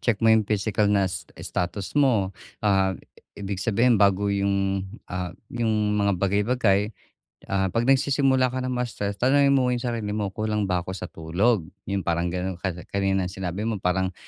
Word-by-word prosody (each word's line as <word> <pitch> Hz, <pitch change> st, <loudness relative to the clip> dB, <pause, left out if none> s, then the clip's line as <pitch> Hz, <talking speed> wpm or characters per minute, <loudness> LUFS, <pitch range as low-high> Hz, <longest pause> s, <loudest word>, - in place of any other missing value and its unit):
check 120 Hz, -4 st, +1 dB
mo 110 Hz, -, +7 dB
'yong 110 Hz, -, +5 dB
physical 105 Hz, 0 st, +1 dB
na 100 Hz, -1 st, +3 dB
sta 95 Hz, -, -5 dB
status 90 Hz, +2 st, -3 dB
mo. 120 Hz, -10 st, +2 dB, 0.3 s
Ah, 95 Hz, -2 st, +2 dB, 0.4 s
ibig 100 Hz, -1 st, -4 dB
sabihin, 115 Hz, +3 st, +3 dB
bago 100 Hz, 0 st, +3 dB
'yong, 100 Hz, -1 st, 0 dB, 0.2 s
ah, 90 Hz, -1 st, -5 dB, 0.2 s
'yong 110 Hz, -3 st, +1 dB
mga 100 Hz, 0 st, +2 dB
bagay-bagay, 100 Hz, +1 st, +1 dB, 0.5 s
ah, 95 Hz, 0 st, +1 dB
'pag 115 Hz, -, +2 dB
nagsisimula 130 Hz, -2 st, +3 dB
ka 130 Hz, -, -2 dB
ng 130 Hz, -, -2 dB
ma-stress, 115 Hz, -5 st, -3 dB
tanungin 140 Hz, +2 st, +4 dB
mo 135 Hz, -2 st, +3 dB
'yong 125 Hz, -1 st, 0 dB
sarili 115 Hz, -4 st, -2 dB
mo, 105 Hz, -2 st, -2 dB
"Kulang 105 Hz, +1 st, -1 dB
ba 90 Hz, -, +2 dB
ako 95 Hz, -, -4 dB
sa 95 Hz, -, -7 dB
tulog?" 85 Hz, +4 st, 0 dB, 0.2 s
'Yong 100 Hz, -1 st, -2 dB
parang 85 Hz, +1 st, 0 dB
ganon. 90 Hz, +1 st, -3 dB
Ka 95 Hz, +2 st, -3 dB, 0.2 s
kanina 95 Hz, -1 st, 0 dB
sinabi 95 Hz, +2 st, -4 dB
mo 110 Hz, -4 st, -2 dB
parang 95 Hz, +1 st, 0 dB
100 Hz, 170 wpm, -25 LUFS, 95-115 Hz, 0.5 s, mo